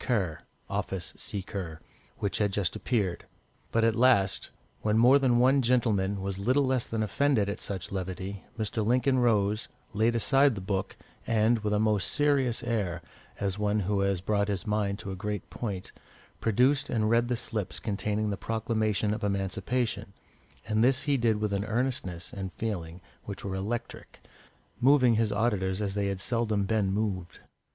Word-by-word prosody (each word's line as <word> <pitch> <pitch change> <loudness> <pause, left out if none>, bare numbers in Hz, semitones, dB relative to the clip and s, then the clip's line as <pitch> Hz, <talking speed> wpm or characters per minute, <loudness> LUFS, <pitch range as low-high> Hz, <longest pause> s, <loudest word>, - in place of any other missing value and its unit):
Kerr 95 -11 0 0.3
(office 90 -3 -3
seeker), 95 -5 -5 0.4
which 100 -3 -1
had 105 -2 +2
just 100 -2 0
appeared. 100 -8 -1 0.4
But 115 - +2
at 115 0 +4
last, 115 -6 +3 0.3
when 105 0 +2
more 125 +5 +7
than 125 -3 +3
one 130 +3 +5
gentleman 105 -6 +1
was 100 0 -3
little 130 +7 +2
less 130 -2 0
than 110 -1 -1
offended 120 -1 +2
at 100 - -4
such 95 -3 -5
levity, 95 +1 -4
Mr. 110 0 -1
Lincoln 130 +4 +2
rose, 110 -2 +2 0.3
laid 110 +3 +2
aside 135 +2 +4
the - - -4
book, 95 0 -3 0.3
and, 115 +1 +3
with 105 -1 -2
a 105 - +2
most 105 -2 +2
serious 135 -5 +1
air, 100 -8 -1 0.4
as 100 -1 -1
of - - -8
one 105 0 +1
who 100 +1 0
has 100 -2 +1
brought 100 +1 +1
his 100 -2 -2
mind 105 -2 0
to 100 - -6
a - - -4
great 105 +1 -4
point, 100 -6 -5 0.5
produced 130 +5 +2
and 110 -2 +1
read 115 +1 +3
the 125 -1 0
slips 105 -4 -4
containing 105 0 -1
the 100 - -3
Proclamation 110 -2 0
of 110 - -5
Emancipation, 100 +3 -1 0.5
and 110 0 +2
this 130 +2 +3
he 145 -1 +2
did 115 -4 +2
with 105 -1 -1
an 100 0 0
earnestness 110 -7 -2
and 95 -2 -5
feeling 90 -6 -4 0.2
which 100 -1 -7
were 95 - -3
electric, 105 +5 -5 0.6
moving 130 -2 +5
his 110 -1 +1
auditors 95 -4 0
as 100 -2 -2
they 100 0 0
had 100 -1 -2
seldom 110 -2 0
been 105 -2 +1
moved. 95 -4 -2
105 Hz, 170 wpm, -29 LUFS, 100-120 Hz, 0.6 s, more